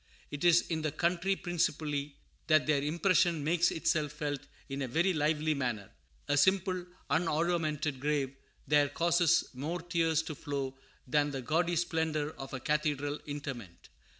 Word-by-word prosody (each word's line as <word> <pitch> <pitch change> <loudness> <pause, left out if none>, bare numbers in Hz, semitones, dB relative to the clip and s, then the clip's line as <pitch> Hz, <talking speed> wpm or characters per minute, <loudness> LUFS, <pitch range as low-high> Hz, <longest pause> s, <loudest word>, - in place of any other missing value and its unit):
It 145 +1 -5
is 175 -1 +6
in 160 -2 -3
the 155 -1 -1
country 180 +5 +1
principally 150 -5 -1 0.3
that 155 -2 +4
their 150 -2 +2
impression 170 +1 +2
makes 170 +3 +3
itself 155 -2 0
felt 145 -2 -3 0.3
in 135 0 -4
a 135 - -1
very 170 +9 +2
lively 155 0 +1
manner. 120 -8 -3 0.4
A 145 - +2
simple, 185 +3 +2 0.2
unoruamented 155 -4 0
grave 140 -1 -1 0.3
there 145 -1 +4
causes 170 +2 +3
more 150 +7 -3
tears 165 -2 +1
to 160 - -5
flow 140 -2 -4 0.3
than 145 +3 +2
the 135 -2 -5
gaudy 170 +6 +1
splendor 160 -3 0
of 135 - -7
a 130 - -4
cathedral 145 0 -1
interment. 135 - -7
150 Hz, 150 wpm, -31 LUFS, 145-170 Hz, 0.4 s, is